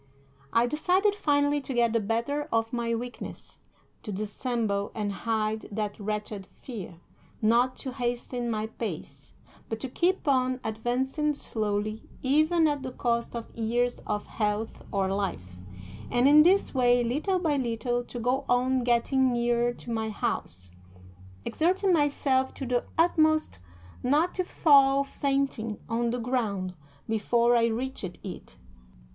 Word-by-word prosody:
I 230 +1 +4
decided, 365 - +2
finally, 290 -6 +2
to 265 -2 -5
get 235 -1 +3
the 230 - +3
better 235 +8 -1
of 225 0 0
my 235 -1 0
weakness; 245 +1 -7 0.4
to 210 - -6
dissemble 210 0 -2
and 205 -2 -2
hide 220 0 -1
that 210 0 -3
wretched 210 -1 -4 0.2
fear; 205 -9 -7 0.4
not 240 +4 +3
to 260 - -6
hasten 245 -1 -3
my 215 -1 -1
pace, 155 - -7 0.3
but 225 - -3
to 265 - -3
keep 350 +7 0
on 255 -2 +2
advancing 260 +7 -1
slowly, 215 -3 -3
even 310 +5 +3
at 290 -2 -1
the 260 -1 -5
cost 235 -1 -1
of 230 -1 -7
years 240 +2 0
of 210 0 -2
health 210 0 -1 0.2
or 195 -1 0
life, 95 - -4 0.5
and 245 +2 +3
in 295 +2 +8
this 370 +5 +4
way, 245 -2 +4
little 300 +11 0
by 325 -5 +1
little, 245 -1 -1
to 245 - -7
go 250 +4 0
on 255 +1 +2
getting 250 +2 +2
nearer 240 0 +1
to 240 0 -9
my 220 -1 -1
house, 95 - -3 0.7
exerting 370 +3 +2
myself 280 -4 +1
to 270 - -5
the 245 -1 0
utmost 315 - +3 0.4
not 300 +8 +2
to 370 - 0
fall 275 -5 +5
fainting 275 -6 -1
on 235 +1 0
the 245 - -1
ground 220 -7 -1 0.3
before 235 +2 +2
I 230 -1 +4
reached 250 +3 -3 0.2
it. 180 - -9
240 Hz, 140 wpm, -28 LUFS, 220-275 Hz, 0.7 s, in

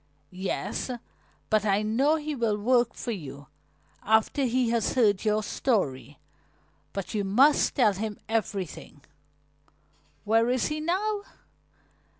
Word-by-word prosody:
"Yes, 190 +7 -3 0.6
but 215 -1 +3
I 205 0 +2
know 260 +9 +2
he 305 -1 -3
will 230 -6 0
work 240 +2 +2
for 240 - -4
you 140 - -8 0.5
after 220 +6 +2
he 245 -1 +1
has 235 -2 0
heard 210 -6 +3
your 215 0 +1
story. 145 - -1 0.7
But 195 +1 -5
you 210 -2 0
must 255 +10 +4
tell 220 -6 +4
him 210 +2 -4
everything." 205 -5 -3 1.2
"Where 225 +2 +3
is 250 -1 +1
he 305 0 -3
now?" 400 +6 -1
220 Hz, 125 wpm, -27 LUFS, 200-255 Hz, 1.2 s, must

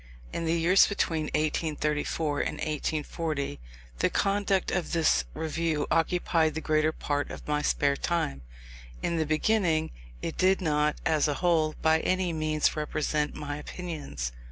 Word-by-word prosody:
In 165 - -2
the 165 +1 +2
years 180 +4 +6
between 165 -6 0
1834 150 -1 -1
and - - -1
1840 155 - -2 0.4
the - - +3
conduct 200 -1 +1
of 180 - -1
this 165 -2 +3
Review 160 -1 -1
occupied 165 -2 +2
the - - -1
greater 155 0 +2
part 145 -2 -2
of - - -9
my 150 0 +1
spare 140 -1 +2
time. 140 - -1 0.6
In 170 - 0
the 160 -1 0
beginning, 160 0 +1 0.3
it - - -4
did 190 +1 +4
not, 150 -3 +1
as 155 -1 +3
a 145 - 0
whole, 160 -3 +2
by 160 0 +4
any 185 0 0
means 155 -1 +1
represent 150 0 -1
my 145 -1 -4
opinions. 150 - -5
155 Hz, 145 wpm, -28 LUFS, 150-170 Hz, 0.6 s, years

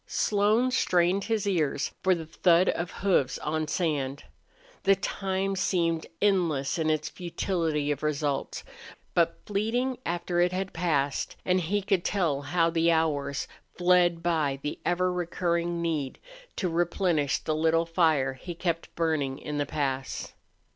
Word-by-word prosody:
Slone 215 +5 +2
strained 185 -4 +2
his 220 -2 0
ears 155 -8 0
for 185 -1 +3
the 165 -2 -6
thud 170 +2 +3
of 170 +1 -1
hoofs 180 -11 +1
on 155 +1 -2
sand. 145 -5 -1 0.6
The 195 - +4
time 195 0 -2
seemed 170 -3 0
endless 170 -8 +1
in 160 -1 +1
its 155 -1 0
futility 165 -4 -1
of 145 - -3
results, 145 -2 -2 0.5
but 170 -1 +2
fleeting 235 +5 -1
after 175 0 -1
it 175 0 +3
had 190 +1 -3
passed; 145 -5 0
and 185 0 +3
he 200 +4 -1
could 190 -2 +1
tell 165 -8 0
how 165 +4 +1
the 165 0 +2
hours 145 -4 0 0.3
fled 175 -1 +3
by 155 -5 +1
the 150 - -4
ever 180 +1 +1
recurring 170 -1 -1
need 155 -5 -2 0.4
to 185 - -1
replenish 170 -3 +1
the 155 - -2
little 165 +1 +2
fire 160 -6 +2
he 170 +7 -8
kept 165 -1 -3
burning 155 -5 0
in 150 0 -4
the 145 - -1
pass. 135 -3 -3
170 Hz, 145 wpm, -28 LUFS, 150-185 Hz, 0.6 s, The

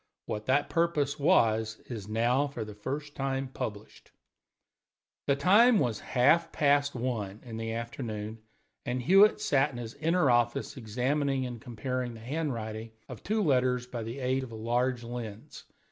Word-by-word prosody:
What 105 0 -5
that 135 +3 +3
purpose 155 -4 0
was 110 -5 +3
is 110 -5 -7
now 120 +6 +2
for 120 -6 -5
the 105 - -8
first 145 +8 -5
time 135 -1 -2
published. 105 -4 -7 1.2
The 140 - +4
time 210 - +6
was 120 - 0
half 160 +7 +3
past 145 -2 +2
one 110 -5 -3
in 115 -2 -7
the 115 0 -3
afternoon, 115 -2 -5 0.4
and 125 0 -2
Hewitt 195 - +6
sat 140 -7 +2
in 130 - -9
his 115 -1 -6
inner 160 -2 +2
office 120 +3 +1
examining 130 +4 -1
and 120 -3 -6
comparing 125 +1 -4
the - - -10
handwriting 115 -5 -4
of 125 - -9
two 215 +1 0
letters 125 -5 +2
by 125 -2 -6
the 115 +3 -5
aid 130 0 0
of 125 - -8
a - - -7
large 120 +2 0
lens. 115 -3 -7
125 Hz, 160 wpm, -29 LUFS, 115-140 Hz, 1.2 s, time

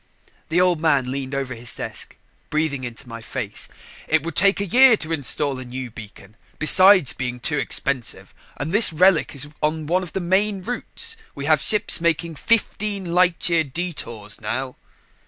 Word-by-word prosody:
The 165 +2 +2
Old 180 -3 +2
Man 140 -6 +2
leaned 135 0 -4
over 135 -2 -3
his 120 0 -3
desk, - - -7 0.3
breathing 150 -3 -1
into 120 +2 -7
my 115 -1 -8
face. - - -6 0.4
"It 160 -2 +2
would 165 -2 -5
take 195 +2 +3
a 200 - -1
year 245 +3 +6
to 160 -3 -6
install 145 -2 -1
a - - -6
new 125 0 -7
beacon 105 -1 -13 0.2
besides 185 -1 +6
being 125 -1 -4
too 150 +4 -1
expensive 135 -4 -4 0.2
and 155 - -4
this 210 -2 +4
relic 175 -1 +3
is 140 +1 0
on 155 0 -1
one 180 +4 +1
of 180 - -7
the - - -1
main 190 +2 0
routes. 450 - -5 0.2
We 140 - -6
have 155 -1 +3
ships 210 -5 +1
making 170 0 0
fifteen 205 -4 -1
light 180 -1 +3
year 170 -2 +3
detours 130 - -6
now." 125 +4 -4
155 Hz, 175 wpm, -22 LUFS, 130-185 Hz, 0.4 s, year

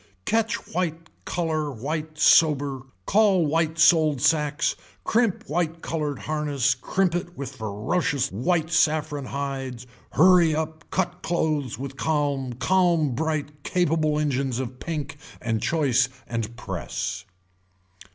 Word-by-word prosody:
Catch 225 0 +1 0.2
white 165 -2 -2
color 160 -4 -1
white 155 +5 -4
sober, 140 -5 +4 0.2
call 200 -5 +4
white 160 +1 0
sold 155 -3 +5
sacks, 150 +2 +2 0.3
crimp 225 -4 +1
white 165 +1 -2
colored 150 -4 -2
harness 145 -4 0
crimp 175 +8 0
it 175 0 -4
with 140 - -6
ferocious 115 - -1
white 160 - 0
saffron 155 -3 +1
hides, 135 -3 -4 0.3
hurry 170 -1 +5
up 160 0 -4
cut 180 -1 -2
clothes 155 -8 -1
with 135 +1 -7
calm 145 -5 0
calm 170 0 +2
bright 150 0 -2
capable 155 -3 +1
engines 135 -4 0
of 130 -1 -5
pink 150 -2 -4 0.2
and 115 -3 -1
choice 135 -5 +2 0.2
and 115 0 -4
press. 120 - -4
150 Hz, 120 wpm, -25 LUFS, 135-165 Hz, 0.3 s, sold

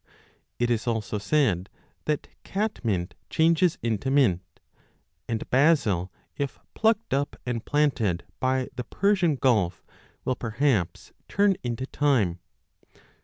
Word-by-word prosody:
It 120 0 +1
is 115 0 0
also 110 -2 -1
said 100 - +1 0.4
that 150 -1 -1 0.2
catmint 115 - -2 0.2
changes 165 +1 +3
into 115 +2 -1
mint, 125 -11 +3 0.9
and 115 -2 -2
basil, 125 - +3 0.2
if 140 -2 -3 0.2
plucked 220 -4 +1
up 140 +1 0
and 120 -2 -1
30 - - -34
planted 125 - +1 0.2
by 130 0 +1
the 125 - -3
Persian 185 - +2
Gulf, 105 - +1 0.4
will 130 - +2
perhaps 115 - 0 0.2
turn 200 -1 +3
into 120 +1 -3
thyme. 120 -13 +1
130 Hz, 120 wpm, -26 LUFS, 110-150 Hz, 0.9 s, changes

